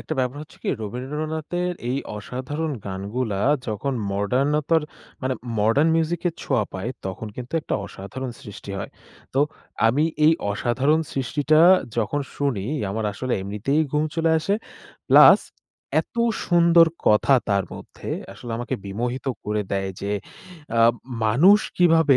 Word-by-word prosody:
একটা - - -6
ব্যাপার 130 +2 0
হচ্ছে 155 - -15
কী - - -3
রবীন্দ্রনাথের 155 - -3 0.2
এই 135 - 0 0.2
অসাধারণ 145 +8 -4
গানগুলা 100 +2 -3 0.3
যখন 110 +5 -2 0.2
মডার্নতার 140 +10 +1 0.4
মানে 130 0 0 0.2
মডার্ন 115 +9 +3
মিউজিকের 170 +1 0
ছোঁয়া 110 - +1
পায় 95 +6 -4 0.2
তখন 95 +3 -5
কিন্তু 125 0 -7
একটা - - -3
অসাধারণ 115 +8 -7
সৃষ্টি 105 -3 -9
হয়। 100 - -5 0.4
তো 135 - +3 0.5
আমি 140 +7 +3 0.2
এই 160 - +7 0.2
অসাধারণ 130 +9 +1
সৃষ্টিটা 145 +4 +2 0.4
যখন 120 +6 0 0.2
শুনি 135 -9 -1 0.3
আমার 110 +2 -2
আসলে 130 +4 -3
এমনিতেই 105 +10 0
ঘুম 150 +1 +2
চলে 165 0 +2
আসে। 195 +6 0 0.5
প্লাস - - +9 0.6
এত - - -14 0.3
সুন্দর 170 -1 +6 0.2
কথা 105 +6 +5
তার 100 -1 +2
মধ্যে - - -10 0.2
আসলে 120 - -9
আমাকে 120 +2 -3
বিমোহিত 120 +7 -3 0.2
করে 105 0 -1
দেয় 95 0 -1
যে 100 +1 -2 0.7
আ - - +5 0.4
মানুষ 170 - +6 0.2
কীভাবে 165 -5 +5
130 Hz, 135 wpm, -23 LUFS, 105-155 Hz, 0.7 s, প্লাস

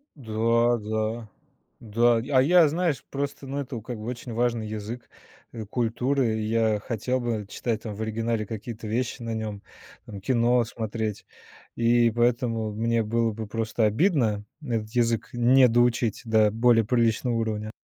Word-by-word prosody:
Да 115 -1 +1
да 110 +1 -3 0.5
да. 115 +2 +2 0.2
А 130 -1 +5
я, 170 +2 +6
знаешь, 165 -4 -1
просто, 140 0 -4
ну, 140 +1 -3
это 125 -4 -5
как 115 0 -7
бы 110 - -7
очень 120 -1 -6
важный 120 -1 0
язык, 110 +3 -6 0.4
э, 115 -2 -6
культуры. 120 +1 0
Я 110 -1 +1
хотел 125 +3 -2
бы 115 -4 -2
читать 110 0 -3
там 110 -2 -5
в 110 - -7
оригинале 110 0 -1
какие-то 110 +1 -7
вещи 120 +3 -2
на 115 -1 -4
нём, 105 -2 -5 0.5
там 100 -2 -8
кино 120 +1 +2
смотреть. 110 -2 -4 0.5
И 120 0 +4
поэтому 120 -2 +1
мне 115 +1 0
было 115 +1 0
бы 110 +1 -6
просто 115 +1 -1
обидно 110 - +2 0.2
этот 115 -5 -2
язык 115 -2 +1
не 125 +2 +5
доучить 120 -1 +1
до 110 -2 +4
более 115 +1 +4
приличного 120 +1 +1
уровня. 110 -2 -2
115 Hz, 150 wpm, -26 LUFS, 110-120 Hz, 0.5 s, я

